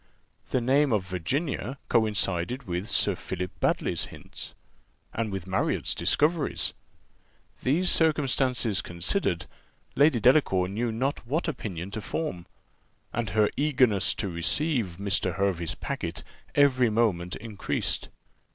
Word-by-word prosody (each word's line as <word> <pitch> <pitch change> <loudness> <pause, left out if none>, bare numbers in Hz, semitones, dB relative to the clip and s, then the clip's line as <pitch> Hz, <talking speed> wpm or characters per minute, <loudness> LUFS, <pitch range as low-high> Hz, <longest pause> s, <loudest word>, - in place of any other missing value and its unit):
The 130 - +1
name 135 +3 +3
of 105 -4 +1
Virginia 130 - -2
coincided 110 +1 +1
with 90 +2 -3
Sir 100 - +3
Philip 90 0 -4
Baddely's - - +1
hints, - - -10 0.6
and 110 -2 -2
with 95 -3 -4
Marriott's 95 0 0
discoveries: 155 0 +1 0.9
these 170 +8 +3
circumstances 130 - +2
considered, 85 - -1 0.5
Lady 145 -3 +5
Delacour 110 -7 +4
knew 115 +4 -1
not 125 +1 -2
what 155 +8 0
opinion 100 - -4
to 110 - -4
form; 105 - -4 0.7
and 120 -1 -1
her 105 -1 +3
eagerness 130 -9 +3
to - - -2
receive 95 - 0
Mr. 95 -3 0
Hervey's 90 -4 0
packet - - -4 0.3
every 130 -4 +5
moment 100 -6 +1
increased. 105 -2 -2
110 Hz, 115 wpm, -27 LUFS, 95-135 Hz, 0.9 s, Lady